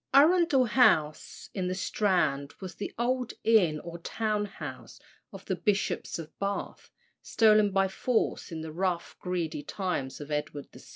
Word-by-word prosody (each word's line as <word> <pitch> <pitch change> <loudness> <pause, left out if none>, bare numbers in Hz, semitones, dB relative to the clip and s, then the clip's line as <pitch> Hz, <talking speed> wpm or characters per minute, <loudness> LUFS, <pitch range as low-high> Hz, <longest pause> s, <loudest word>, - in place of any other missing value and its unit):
Arundel 305 -2 +5
House, 160 - +2
in 185 -2 -2
the 185 - -2
Strand, 180 -8 0
was 185 -2 -7
the 205 - -5
old 250 +1 -1
inn 185 -9 +4
or 170 0 -8
town 210 +3 -1
house 200 - -9 0.3
of - - -11
the - - -1
Bishops 205 -3 -1
of 165 -2 -9
Bath, 200 0 -4 0.3
stolen 215 -2 +4
by 195 0 +2
force 220 +1 -1
in 160 -1 -5
the 160 0 -6
rough, 175 +1 -2
greedy 170 -4 -3
times 160 -6 -3
of 145 0 -8
Edward 150 -1 -3
VI. - - -13
190 Hz, 155 wpm, -29 LUFS, 160-215 Hz, 0.3 s, Arundel